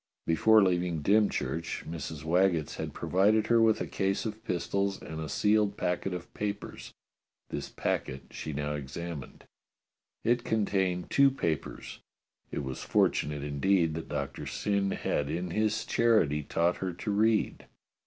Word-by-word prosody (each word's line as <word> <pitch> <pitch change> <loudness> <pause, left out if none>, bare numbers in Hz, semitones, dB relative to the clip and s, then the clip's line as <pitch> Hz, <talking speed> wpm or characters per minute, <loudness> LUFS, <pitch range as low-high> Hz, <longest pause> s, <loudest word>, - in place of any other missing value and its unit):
Before 110 +6 +5
leaving 90 -4 0
Dymchurch, 100 -4 +1
Mrs. 80 -2 -6
Waggetts 85 -1 +2
had - - -4
pro - - -6
vided 105 +4 +4
her 115 -1 +4
with 110 -1 +4
a - - 0
case 95 +2 -1
of 110 0 -5
pistols 100 0 -1
and 80 +1 -7
a 80 - -5
sealed 105 -1 +2
packet 90 +2 -1
of 90 -1 -6
papers. 105 -1 -5 0.6
This - - -4
packet 65 +1 -2
she 75 - -5
now 75 +1 -2
examined. 75 +1 -6 0.8
It 120 +1 +2
contained 95 -5 0
two 140 0 +6
papers. 85 - -3 0.5
It - - -3
was 65 -1 -5
fortunate, 75 -1 +1
indeed, 80 +4 +2
that 80 +1 -6
Doctor - - -4
Syn 100 -1 0
had 75 -6 -1
in 90 +1 -3
his 110 +3 0
charity 105 -11 +3
taught 85 +4 +1
her 95 -2 -3
to 95 +4 -4
read 110 +1 +1
90 Hz, 145 wpm, -30 LUFS, 80-105 Hz, 0.8 s, two